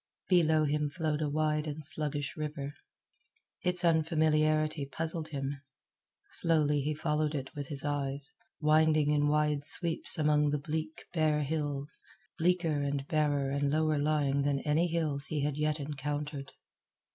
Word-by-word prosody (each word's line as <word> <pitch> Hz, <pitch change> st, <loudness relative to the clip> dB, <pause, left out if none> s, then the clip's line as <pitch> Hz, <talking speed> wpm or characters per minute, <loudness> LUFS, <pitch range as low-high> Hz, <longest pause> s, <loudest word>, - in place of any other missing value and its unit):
Below 160 Hz, -4 st, +4 dB
him 150 Hz, 0 st, 0 dB
flowed 155 Hz, 0 st, -2 dB
a 150 Hz, -, 0 dB
wide 150 Hz, +1 st, 0 dB
and 150 Hz, 0 st, -6 dB
sluggish 145 Hz, -2 st, -2 dB
river. 150 Hz, -2 st, -5 dB, 0.9 s
Its 180 Hz, 0 st, +2 dB
unfamiliarity 155 Hz, -2 st, +2 dB
puzzled 160 Hz, +3 st, -3 dB
him. 140 Hz, -1 st, -4 dB, 0.7 s
Slowly 150 Hz, -3 st, +3 dB
he 150 Hz, +2 st, -2 dB
followed 150 Hz, +1 st, -1 dB
it 135 Hz, -2 st, -5 dB
with 145 Hz, -3 st, -6 dB
his 140 Hz, 0 st, -4 dB
eyes, 140 Hz, -1 st, -2 dB, 0.3 s
winding 155 Hz, -1 st, +3 dB
in 145 Hz, 0 st, +2 dB
wide 150 Hz, -1 st, +1 dB
sweeps 165 Hz, 0 st, +4 dB
among 150 Hz, -1 st, +3 dB
the 150 Hz, -, 0 dB
bleak, 155 Hz, +2 st, -5 dB
bare 155 Hz, -3 st, +2 dB
hills, 145 Hz, -1 st, -2 dB, 0.4 s
bleaker 165 Hz, -3 st, +1 dB
and 140 Hz, -1 st, -2 dB
barer 145 Hz, -4 st, +1 dB
and 140 Hz, 0 st, 0 dB
lower 155 Hz, 0 st, +1 dB
lying 145 Hz, -2 st, +1 dB
than 140 Hz, -1 st, 0 dB
any 155 Hz, +3 st, +1 dB
hills 155 Hz, -5 st, -1 dB
he 150 Hz, -2 st, -2 dB
had 145 Hz, 0 st, -1 dB
yet 150 Hz, +1 st, -1 dB
encountered. 145 Hz, 0 st, -4 dB
150 Hz, 145 wpm, -31 LUFS, 145-155 Hz, 0.9 s, Below